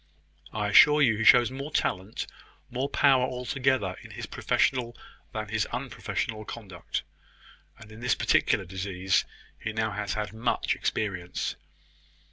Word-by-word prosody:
I 105 -1 -1
assure 150 +8 +7
you 115 -5 +4
he 110 - -2
shows 120 +2 +7
more 135 +3 -5
talent, 95 -8 -1 0.5
more 130 +3 -2
power 135 -3 +4
altogether, 125 -5 0
in - - -12
his - - -6
professional 120 -2 0 0.3
than 110 -3 -4
his 110 0 0
unprofessional 120 -3 -3
conduct; 100 -6 -6 0.7
and 110 -1 -14
in 110 - -11
this 125 +1 +1
particular 95 - +2
disease 95 0 0 0.3
he 110 - -4
has 110 - -7
now 110 -1 +1
had 105 +1 -3
much 115 +2 0
experience." 95 -4 -2
110 Hz, 135 wpm, -28 LUFS, 100-125 Hz, 0.7 s, assure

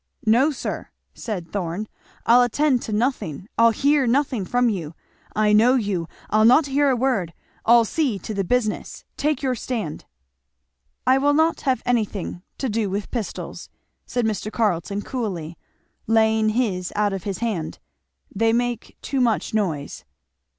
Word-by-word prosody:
"No, 240 +7 +4
sir," 285 - -5 0.2
said 180 -7 -5
Thorn, 195 +1 -3 0.4
"I'll 240 +2 +6
attend 255 +1 +2
to - - -6
nothing 210 - -1
I'll 230 0 +6
hear 280 +4 +2
nothing 250 -4 +1
from 245 +4 +2
you. 170 -8 -3 0.4
I 210 0 +3
know 235 +5 +5
you! 200 -8 -1 0.2
I'll 215 +1 +4
not 255 +7 +6
hear 280 +1 +2
a 260 - +3
word. 230 -9 0 0.3
I'll 235 0 +7
see 265 -3 0
to 205 +4 -6
the 195 -1 -1
business! 215 +2 -1
Take 300 0 -1
your 260 -2 +1
stand." 225 -10 -4 1.0
"I 260 +1 +4
will 290 +1 +3
not 320 +2 +2
have 255 - +1
anything 210 -7 -1 0.2
to 270 - -2
do 220 -2 -1
with 200 +1 -4
pistols," 230 -5 -5 0.4
said 245 -2 -1
Mr. 215 -1 -2
Carleton 200 -2 -1
coolly, 185 -10 -4 0.5
laying 220 0 +3
his 210 -6 -1
out 205 -1 +1
of 195 - -5
his 195 -2 -2
hand; 210 -9 -3 0.6
"they 225 +3 +2
make 240 -1 -2
too 275 -2 -1
much 230 -3 +1
noise." 170 -10 -2
225 Hz, 155 wpm, -23 LUFS, 200-250 Hz, 1.0 s, I'll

